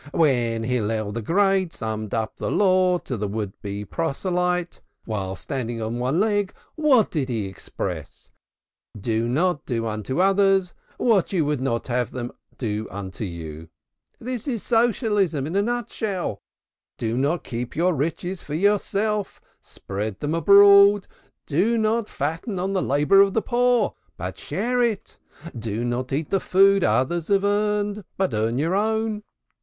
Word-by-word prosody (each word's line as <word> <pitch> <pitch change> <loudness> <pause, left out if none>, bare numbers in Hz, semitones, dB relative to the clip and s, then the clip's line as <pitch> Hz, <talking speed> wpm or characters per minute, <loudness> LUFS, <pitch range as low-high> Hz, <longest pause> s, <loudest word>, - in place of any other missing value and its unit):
"When 120 -8 +2
Hillel 110 -3 -1
the 115 +3 -4
Great 190 - +2
summed 110 -1 -4
up 110 -1 -3
the - - -3
law 185 -2 +3
to 135 - -5
the 105 0 -2
would 105 -1 -5
be 100 0 -5
proselyte 180 - -1 0.2
while 95 -4 -3
standing 120 +1 -4
on 115 +2 -3
one 130 +7 0
leg, 205 -2 +1 0.2
how 295 -7 +5
did 145 -8 -3
he 110 -4 -1
express 95 -2 -7 0.6
it? - - -9
'Do 115 +2 0
not 155 +4 0
unto 115 +3 -2
others 195 -1 +3 0.2
what 215 -7 +2
you 175 -6 +1
would 145 -3 -1
not 120 -3 -1
have 125 -1 -2
others 120 -1 -4 0.3
do 110 -3 -3
unto 100 +2 -6
you.' 80 -3 -8 0.5
This 250 +1 -5
is 235 -6 -2
Socialism 210 - +1
in 160 +5 -4
a 200 - +4
nut 240 +1 -2
shell. 185 - -3 0.6
Do 115 0 -2
not 145 +6 0
keep 120 +1 -5
your 175 +3 +2
riches 165 +5 -3
for 145 - -6
yourself, 205 +2 0 0.2
spread 100 +1 -6
them 150 +1 -2
abroad. 200 +2 +7 0.4
Do 195 +11 +1
not 220 0 +1
fatten 165 - -3
on 190 +2 -1
the 190 - +1
labor 145 +8 +4
of 200 -1 +3
the 225 - +1
poor, 245 0 +2 0.2
but - - -6
share 245 +2 -1
it. 230 -5 -2 0.4
Do 115 0 -3
not 125 +2 -2
eat 145 +3 -2
the 195 - +3
food 195 +1 +4
others 130 +10 +1
have 200 -1 +2
earned, 205 0 0
but 190 -10 0
earn 110 +3 0
your 160 +6 0
own. 220 +1 0
165 Hz, 155 wpm, -23 LUFS, -, 0.6 s, abroad